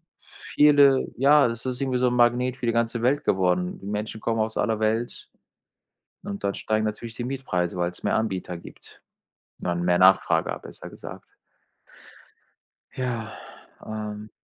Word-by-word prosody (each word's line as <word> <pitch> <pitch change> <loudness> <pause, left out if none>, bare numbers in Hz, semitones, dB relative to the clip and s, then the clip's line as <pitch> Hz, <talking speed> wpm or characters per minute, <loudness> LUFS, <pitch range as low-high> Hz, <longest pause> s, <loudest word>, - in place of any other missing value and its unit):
viele 145 -2 +3
ja, 140 +1 +5
das 115 +1 -5
ist 125 0 -3
irgendwie 130 -2 0
so 125 - +3
'n 125 - 0
Magnet 125 +1 +2
für 125 - -5
die 115 - +2
ganze 115 0 0
Welt 135 +4 +1
geworden. 90 -1 +1
Die 95 - -12
Menschen 105 +1 -4
kommen 115 -1 -1
aus 110 0 -1
aller 110 +1 0
Welt 110 +2 -2 0.9
und 100 0 -6
dann 100 0 0
steigen 110 0 -1
natürlich 110 +2 -5
die 120 - -4
Mietpreise, 90 -10 -2
weil's 90 0 -3
mehr - - +1
Anbieter 95 -5 -2
gibt - - -14 0.6
und - - -6
dann 85 0 -1
mehr 90 0 +3
Nachfrage 95 +1 +4
a - - -6
besser - - -11
gesagt. - - -11 1.6
Ja, 120 -4 -4 0.5
ähm, 105 0 -6
110 Hz, 160 wpm, -25 LUFS, 100-125 Hz, 1.6 s, ja